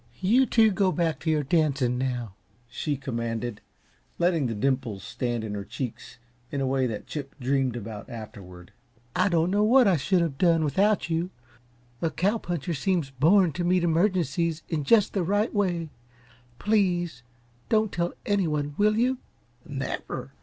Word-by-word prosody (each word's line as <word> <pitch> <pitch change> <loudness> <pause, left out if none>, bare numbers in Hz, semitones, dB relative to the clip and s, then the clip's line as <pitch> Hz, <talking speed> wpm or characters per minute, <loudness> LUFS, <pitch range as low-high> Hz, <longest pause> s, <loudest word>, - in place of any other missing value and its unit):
"You 235 +8 +4
two 220 -2 +4
go 195 -1 +2
back 170 -3 0
to 160 - -3
your 155 -2 +2
dancing 140 -5 +1
now," 125 -5 -2 0.3
she 140 +4 -3
commanded, 115 -4 -4 0.6
letting 170 -5 +2
the 115 - -3
dimples 120 -4 -1
stand 120 -2 -3
in 105 -2 -4
her 100 -1 -4
cheeks 125 +3 -6 0.3
in 140 - -3
a 135 - 0
way 130 -1 +1
that 110 -3 -5
Chip 140 -3 -6
dreamed 130 -1 0
about 110 -1 -7
afterward. 100 -7 -10 0.4
"I 185 +2 +3
don't 170 0 +2
know 205 +1 +3
what 245 +2 +6
I 185 -4 +4
should 180 +6 +2
have 155 -5 -2
done 165 -3 +4
without 190 +5 +1
you 165 +2 0 0.7
a 165 - +1
cow 200 +8 0
puncher 175 -2 -3
seems 165 -1 0
born 165 +7 +4
to 175 +3 -3
meet 180 0 +2
emergencies 170 -2 +1
in 150 -4 -2
just 210 +4 +4
the 195 - 0
right 205 +6 +1
way. 175 -6 0 0.7
PLEASE 175 - +1 0.5
don't 215 -2 +2
tell 175 0 -1
anyone, 150 -8 0
will 210 +1 +3
you?" 250 +2 +1 0.5
"Never. - - -5
160 Hz, 160 wpm, -26 LUFS, 130-185 Hz, 0.7 s, what